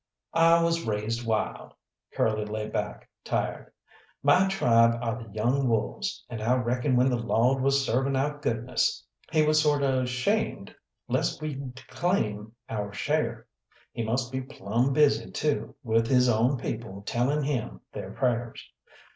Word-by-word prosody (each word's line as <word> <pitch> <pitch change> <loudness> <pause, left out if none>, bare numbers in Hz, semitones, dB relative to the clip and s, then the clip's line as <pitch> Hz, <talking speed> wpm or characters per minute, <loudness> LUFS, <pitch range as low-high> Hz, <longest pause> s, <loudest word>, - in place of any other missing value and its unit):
"I 165 0 +5
was 165 0 +1
raised 110 +2 -2
wild" 110 -1 -2 0.4
Curly 110 -1 +1
lay 105 0 -4
back - - -4 0.2
tired - - -2 0.5
"my 180 +7 +5
tribe 115 -10 +4
are 115 -1 -3
the 115 - -10
young 120 +6 +1
wolves, 110 -2 -2
and 115 - -6
I 120 +3 +2
reckon 125 +2 0
when 125 +1 +4
the 120 - 0
Lawd 120 +3 +2
was 135 0 +2
serving 135 +3 +1
out 145 +2 -1
goodness, 120 -2 0 0.3
He 155 -1 +3
was 155 0 +4
sort 145 -2 +2
of 130 -2 +1
'shamed 125 0 -1 0.3
lest - - 0
we'd 135 -4 -6
claim 110 - -1 0.2
our 105 -2 -3
share. 115 -3 -1 0.5
He - - -4
must 120 +3 -1
be 130 0 -2
plumb 120 +1 -1
busy, 145 0 +3
too, 150 -1 -2
with 115 -1 +2
His 125 0 +4
own 120 +4 +2
people 110 -4 -5
telling 135 +7 0
Him 115 - -3
they'r - - -6
prayers. 120 -3 -2
125 Hz, 150 wpm, -27 LUFS, 115-140 Hz, 0.5 s, I